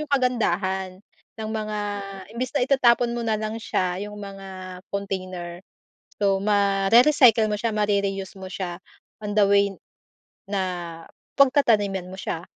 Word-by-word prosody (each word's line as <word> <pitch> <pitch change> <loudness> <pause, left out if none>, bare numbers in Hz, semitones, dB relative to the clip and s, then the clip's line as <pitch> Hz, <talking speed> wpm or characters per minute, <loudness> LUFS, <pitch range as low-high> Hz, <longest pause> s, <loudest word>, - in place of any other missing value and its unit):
'yong 300 -1 -6
kagandahan 190 -7 0 0.4
ng 215 - -4
mga 215 -1 -3 0.6
imbes 250 +1 -3
na 280 - +2
itatapon 245 -3 +4
mo 240 - -2
na 220 - +2
lang 215 +1 -3
siya, 185 -4 -1
'yong 210 - -9
mga 190 -2 -8
container. 185 -3 -4 0.6
So, 195 -1 +3
mare-recycle 215 +4 +5
mo 210 - 0
siya 230 +1 -1
mare-reuse 200 -2 0
mo 190 - -7
siya 180 -2 -4 0.4
on 205 0 -3
the 205 -2 +5
way 200 -1 +4 0.8
na 195 -2 0 0.8
pagtataniman 215 -9 +3
mo - - -8
siya. 170 -3 -4
200 Hz, 135 wpm, -24 LUFS, 190-225 Hz, 0.8 s, mare-recycle